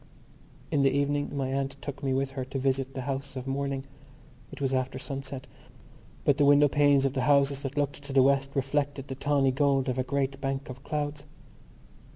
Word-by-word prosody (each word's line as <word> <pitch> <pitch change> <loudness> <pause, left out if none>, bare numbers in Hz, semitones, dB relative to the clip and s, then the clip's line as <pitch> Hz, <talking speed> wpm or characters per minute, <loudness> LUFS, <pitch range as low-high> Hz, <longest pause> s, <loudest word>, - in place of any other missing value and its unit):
In 145 - +2
the 135 - +5
evening 145 +1 0
my 135 -1 -1
aunt 135 0 -2
took 140 -1 -7
me 135 -2 -1
with 135 +1 0
her 135 -1 -4
to 135 +1 -5
visit 135 0 0
the 130 - -3
house 140 0 -4
of 130 -1 -5
mourning. 135 0 -2 0.7
It - - -9
was 135 -1 0
after 130 0 -1
sunset; 135 0 -6 0.8
but 145 +1 +3
the 145 - +5
window 145 +1 +6
panes 145 -1 +4
of 135 - +1
the 130 - -1
houses 140 -1 +4
that 140 0 -5
looked 145 0 -1
to 140 0 -8
the 135 -1 +5
west 135 0 +3
reflected 140 0 -1
the - - -2
tawny 140 0 +2
gold 135 0 +2
of 130 0 -1
a - - +2
great 140 0 -2
bank 135 0 -2
of 130 +2 -11
clouds. 150 0 -3
135 Hz, 200 wpm, -28 LUFS, 135-140 Hz, 0.8 s, window